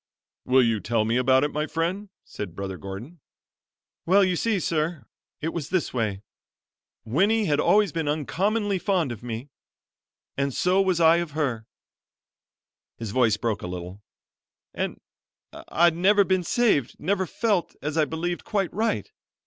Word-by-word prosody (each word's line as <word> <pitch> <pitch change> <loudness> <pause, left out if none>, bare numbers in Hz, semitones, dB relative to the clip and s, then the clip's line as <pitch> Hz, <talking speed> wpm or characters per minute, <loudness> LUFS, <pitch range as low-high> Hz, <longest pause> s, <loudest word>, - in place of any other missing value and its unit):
"Will 130 0 +5
you 115 -2 +1
tell 110 +3 0
me 115 +2 0
about 130 +1 +4
it, 145 - 0
my 150 +1 -1
friend?" 180 +6 -2
said 90 -5 -7
Brother 95 -1 -5
Gordon. 110 - -8 0.9
"Well, 195 +3 +5
you 185 -1 +2
see, 215 +2 0
sir, 160 -1 -1 0.4
it 160 +2 -2
was 160 -5 -4
this 185 -6 -1
way. 105 -5 -2 0.8
Winnie 200 - +2
always 205 +7 +3
had - - -28
been 165 -2 -2
uncommonly 195 +7 0
fond 175 - 0
of 115 - -7
me; 120 +3 -6 0.8
and 140 -1 -1
so 185 +2 +3
was 185 -3 +1
I 165 0 +6
of 170 -4 -3
her," 125 -8 -1 1.3
his 115 -3 -5
voice 115 -3 +3
broke 110 -2 -2
a - - -5
little 90 +2 -7 0.7
"and - - -3 0.7
I'd 170 0 +4
never 200 +4 +4
been 185 -1 +1
saved, 175 - +1
never 190 +2 -1
felt, 205 -5 0
as 150 +1 -2
I 155 -2 +3
believed, 170 +3 -3
quite 195 -4 -1
right. 220 - -1
160 Hz, 155 wpm, -25 LUFS, 120-185 Hz, 1.3 s, I